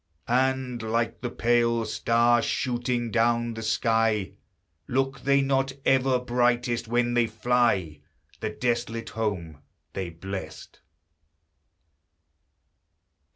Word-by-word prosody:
And, 130 -1 0
like 115 0 -1
the 120 - -2
pale 115 -1 +1
star 120 +2 +2
shooting 120 -1 -1
down 120 +1 +1
the 110 - -6
sky, 110 -2 +1 0.6
Look 135 +1 -1
they 140 +2 +3
not 135 0 +1
ever 135 -1 +3
brightest 120 -1 0
when 120 +1 +1
they 120 -1 +3
fly 115 -9 +1 0.4
The - - -2
desolate 115 0 -2
home 90 -9 -3 0.3
they 95 -2 -3
blessed? 85 -1 -8
120 Hz, 100 wpm, -26 LUFS, 110-125 Hz, 0.6 s, they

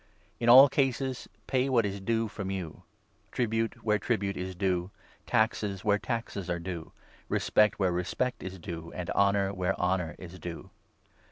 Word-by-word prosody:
In 120 - +2
all 130 +4 +11
cases 135 -1 -1 0.2
pay 130 +1 +1
what 120 -4 +3
is 100 0 -3
due 115 +2 0
from 100 -2 -6
7 95 - -2
you 85 -4 -8 0.2
— - - -38
tribute 115 0 -1
where 105 -1 +2
tribute 100 -5 -1
is 95 0 -5
due, 90 -1 0 0.4
taxes 105 -3 0
where 105 0 +3
taxes 105 -6 -4
are 85 - 0
due, 85 -1 -6 0.4
respect 105 -2 +3
where 95 -3 +2
respect 95 +8 -2
is 95 0 -6
due, 85 -1 -7
and 90 -1 -4
honour 100 0 +2
where 95 0 -1
honour 90 -2 0
is 90 0 -10
due. 85 0 -7
100 Hz, 170 wpm, -29 LUFS, 90-115 Hz, 0.4 s, all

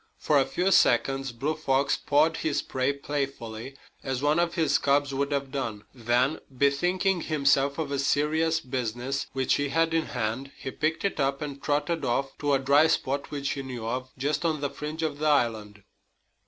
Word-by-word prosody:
For 150 -2 +2
a 135 - +3
few 180 +8 0
seconds 135 -2 +3
Blue 135 +6 -2
Fox 140 -2 +1
pawed 155 +3 +2
his 155 -3 -1
prey 130 +1 0
playfully, 135 -3 -5 0.2
as 135 0 -3
one 150 +3 +3
of 170 0 0
his 165 -3 +2
cubs 140 0 +2
would 140 +1 -1
have 140 -1 -2
done. 115 -7 -4
Then, 125 +4 +1
bethinking 175 +8 +1
himself 140 -2 +2
of 160 -3 -2
the 140 -1 -2
serious 155 +3 +1
business 125 +1 -3
which 130 0 +1
he 145 0 -1
had 165 +2 +1
in 165 -1 +1
hand, 125 +3 -3
he 130 - -6
picked 160 +6 -1
it 195 - -1
up 135 0 +1
and 140 -2 -6
trotted 150 +3 0
off 135 +3 -1
to 145 -1 +1
a - - +5
dry 140 +4 +4
spot 140 -2 -1
which 140 -2 -3
he 140 - -3
knew 125 -4 -6
of, 130 +3 -3
just 145 +4 -1
on 160 -3 0
the 140 -1 -2
fringe 150 +3 -5
of 145 -2 -2
the 155 - 0
island. 110 -8 0
140 Hz, 190 wpm, -27 LUFS, 130-150 Hz, 0.2 s, a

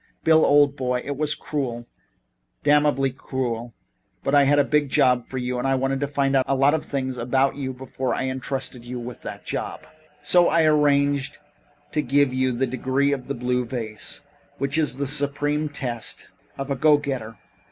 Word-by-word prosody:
"Bill, 160 0 +5
old 145 -1 +5
boy, 125 -2 -1
it 145 - -3
was 150 +1 0
cruel 125 -7 -4 0.8
damnably 145 -2 +3
cruel, 120 -3 -4 0.5
but 135 - -1
I 145 -1 +6
had 145 +1 +4
a 145 - +5
big 145 0 +1
job 125 -4 +3
for 130 - -6
you 125 0 -2
and 130 - -1
I 135 0 +2
had 135 +1 0
to 145 - -1
find 140 -1 0
out 130 - +4
a 135 - +1
lot 140 +2 +4
of 160 - 0
things 130 -2 -3
about 130 +3 +1
you 135 -2 -3
before 130 0 -3
I - - -2
entrusted 130 -1 -4
you 125 +1 -6
with 120 -1 -8
that - - -8
job. - - -4 0.4
So 175 -1 +5
I 165 - +3
arranged 145 -2 +2 0.5
to 150 - +1
give 140 0 +2
you 130 0 +1
the 125 +2 0
Degree 130 +3 0
of 135 -3 -3
the - - -3
Blue 125 +1 0
Vase, 115 -3 -5 0.4
which 140 +1 -2
is 150 -5 +1
the 140 - -1
supreme 145 +1 0
test 125 -5 -3 0.3
of 135 +1 -4
a - - +1
go 150 +2 +5
getter. 130 -7 -5
135 Hz, 190 wpm, -23 LUFS, 125-145 Hz, 0.8 s, I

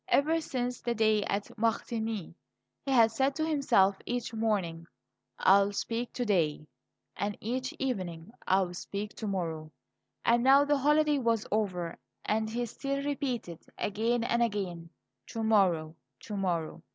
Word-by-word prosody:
Ever 320 +4 +3
since 250 -4 -3
the 240 -1 -1
day 215 -1 +3
at 200 +1 -3
Martigny 225 -4 -1 0.5
he - - -5
had 230 -4 +6
said 270 +4 +1
to 315 - 0
himself 235 -11 +3
each 245 -1 -2
morning; 195 -7 -1 0.5
"I 195 +1 +6
will 200 +1 0
speak 230 +4 -2
to 245 - -2
day," 160 -8 +1 0.5
and 205 0 -2
each 255 +3 -2
evening: 185 -9 -3 0.2
"I 190 +1 +4
will 180 -2 -2
speak 200 +3 -5
to 220 - -4
morrow;" 165 -5 -3 0.5
and 235 0 +4
now 275 +2 +6
the 290 -1 +2
holiday 300 +1 +3
was 230 -3 +1
over, 185 -5 -1 0.3
and 220 +1 0
he 240 +2 -2
still 275 +4 -3
repeated 250 - -3 0.2
again 230 +4 0
and 235 0 +1
again: 190 -7 -2 0.4
"To 225 - -4
morrow, 180 -8 +2 0.3
to 210 - -6
morrow." 175 -5 -2
220 Hz, 150 wpm, -30 LUFS, 190-245 Hz, 0.5 s, had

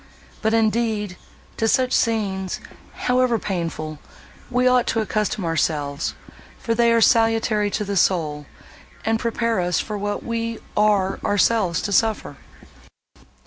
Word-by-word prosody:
But, 220 0 +2
indeed, 220 -3 0 0.4
to 225 - +1
such 255 +2 +2
scenes, 195 -5 0 0.5
however 250 -1 +3
painful, 165 -6 -4 0.5
we 250 0 +2
ought 250 -1 +3
to 225 - +1
accustom 210 -3 -1
ourselves, 145 -3 -1 0.4
for 230 - -1
they 235 0 +3
are 230 0 +3
salutary 225 -2 +3
to 210 +1 -2
the 200 0 -3
soul, 155 -6 +1 0.6
and 225 0 +1
prepare 230 -1 0
us 175 -1 +1
for 210 -1 -4
what 205 0 -3
we 230 0 -3 0.2
are 205 -2 +2
ourselves 205 -3 +2
to 205 - -2
suffer." 220 +2 +1
215 Hz, 130 wpm, -22 LUFS, 190-230 Hz, 0.6 s, however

